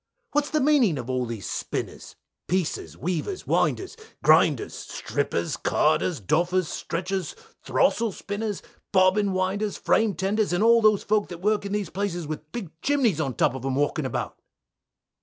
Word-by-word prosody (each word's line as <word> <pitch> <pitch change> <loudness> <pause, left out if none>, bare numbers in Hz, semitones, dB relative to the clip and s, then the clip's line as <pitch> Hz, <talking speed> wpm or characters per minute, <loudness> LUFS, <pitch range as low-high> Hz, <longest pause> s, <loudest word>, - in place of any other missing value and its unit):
What's 295 0 +1
the 310 - +1
meaning 265 - +3
of 125 0 -4
all 125 -1 -1
these 115 -5 -5
Spinners, - - -5 0.3
Piecers, 180 -3 -2
Weavers, 185 - -3
Winders, 385 +3 0 0.3
Grinders, - - +4
Strippers, - - -3
Carders, 175 -5 +1
Doffers, 175 - +1
Stretchers, 180 +2 -3 0.3
Throstle 230 -2 +2
Spinners, 205 +1 -4 0.3
Bobbin 195 +1 +4
Winders, 190 +3 -1
Frame 220 -4 +2
Tenders, 200 +3 0
and 175 +4 +2
all 230 0 +6
those 215 -2 +4
folk 210 0 +1
that 175 - -7
work 210 0 +1
in - - -7
these 205 -5 -2
places 185 -3 -2
with 155 0 -7
big 205 -9 -6
chimneys 255 - +2
at 135 -6 -3
top - - +3
of 130 -1 -7
um' 135 -1 -1
walking 145 +1 0
about? - - -4
190 Hz, 155 wpm, -25 LUFS, 165-215 Hz, 0.3 s, all